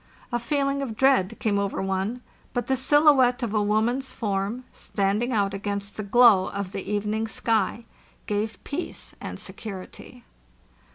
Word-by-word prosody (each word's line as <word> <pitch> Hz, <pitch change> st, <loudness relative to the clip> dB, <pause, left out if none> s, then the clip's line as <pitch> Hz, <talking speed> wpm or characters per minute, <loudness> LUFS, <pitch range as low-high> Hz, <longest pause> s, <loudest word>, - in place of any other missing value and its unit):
A 240 Hz, -, 0 dB
feeling 280 Hz, +2 st, 0 dB
of 230 Hz, -6 st, -4 dB
dread 245 Hz, -6 st, +3 dB
came 205 Hz, -2 st, +1 dB
over 200 Hz, -1 st, -2 dB
one; 195 Hz, +6 st, -2 dB, 0.3 s
but 245 Hz, -2 st, -1 dB
the 265 Hz, -, +1 dB
silhouette 265 Hz, -2 st, +4 dB
of 225 Hz, -3 st, -2 dB
a 215 Hz, -, +2 dB
woman's 230 Hz, +6 st, +1 dB
form, 205 Hz, +2 st, -2 dB
standing 205 Hz, +5 st, -1 dB
out 200 Hz, -4 st, +1 dB
against 200 Hz, 0 st, -4 dB
the -, -, -4 dB
glow 210 Hz, -2 st, +5 dB
of 200 Hz, -2 st, -4 dB
the 195 Hz, 0 st, -5 dB
evening 210 Hz, +2 st, -1 dB
sky, 225 Hz, 0 st, 0 dB, 0.4 s
gave 210 Hz, +1 st, -2 dB
peace 315 Hz, +5 st, -5 dB
and -, -, -6 dB
security. 215 Hz, +4 st, -9 dB
220 Hz, 150 wpm, -25 LUFS, 200-250 Hz, 0.4 s, glow